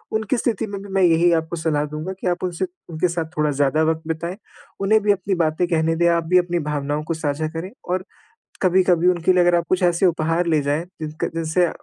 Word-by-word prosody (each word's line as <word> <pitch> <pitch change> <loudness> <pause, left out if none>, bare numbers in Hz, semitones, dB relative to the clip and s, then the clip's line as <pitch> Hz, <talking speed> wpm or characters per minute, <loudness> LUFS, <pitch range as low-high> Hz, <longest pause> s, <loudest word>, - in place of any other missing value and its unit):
उनकी 220 +3 0
स्थिति 225 -2 -1
में 200 -1 -6
भी 200 - -10
मैं 195 -1 +3
यही 170 0 +4
आपको 160 0 -1
सलाह 160 -3 0
दूँगा 155 +5 -5
कि - - -2
आप 175 0 -1
उनसे 180 0 -1 0.2
उनके 165 +2 0
साथ 170 -1 -2
थोड़ा 150 -1 +2
ज़्यादा 145 +2 +1
वक़्त 160 0 0
बिताएँ। 170 +3 -3 0.4
उन्हें 215 +2 +3
भी 210 - +4
अपनी 195 0 0
बातें 165 +1 +1
कहने 165 -1 +1
दे, 170 +1 +2
आप 170 -1 +2
भी 180 +3 +3
अपनी 175 -1 -1
भावनाओं 150 -1 -2
को 165 - -2
साझा 155 -1 -2
करें 165 +4 -6 0.2
और 185 +1 -1 0.6
कभी-कभी 180 -2 +3
उनके 180 0 +3
लिए 180 - +3
अगर 175 0 +3
आप 170 - 0
कुछ 185 0 +1
ऐसे 175 +1 +3
उपहार 165 0 +1
ले 160 -3 +2
जाएँ 145 +4 -1 0.2
जिनका 155 0 -3
जिनसे 165 +2 +1
170 Hz, 225 wpm, -21 LUFS, 160-180 Hz, 0.6 s, यही